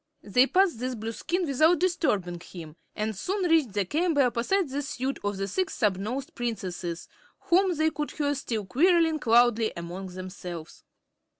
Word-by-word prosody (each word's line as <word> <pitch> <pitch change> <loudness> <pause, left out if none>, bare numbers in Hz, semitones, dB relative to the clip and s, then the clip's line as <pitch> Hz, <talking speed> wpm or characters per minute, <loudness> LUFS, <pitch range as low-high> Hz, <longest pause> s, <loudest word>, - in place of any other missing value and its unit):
They 250 +6 +4
passed 365 - +2
this 255 +1 -2
Blueskin 230 - -2
without 310 +4 +4
disturbing 210 - 0
him 165 -3 -10 0.2
and 215 0 -2
soon 370 - -1
reached 315 - +3
the 200 -1 0
chamber 310 - +2
opposite 255 +10 +1
the 280 +2 -3
suite 270 -1 -3
of 205 -1 -2
the 195 0 -2
Six 370 - -2
Snubnosed 215 +6 -1
Princesses, 185 -7 -4 0.3
whom 370 +1 +3
they 315 +1 +2
could 300 -1 -3
hear 290 -1 -1
still 230 -6 -3
quarreling 325 - +3
loudly 235 -1 +4
among 175 +3 -6
themselves. 180 -2 -8
245 Hz, 155 wpm, -27 LUFS, 195-315 Hz, 0.3 s, They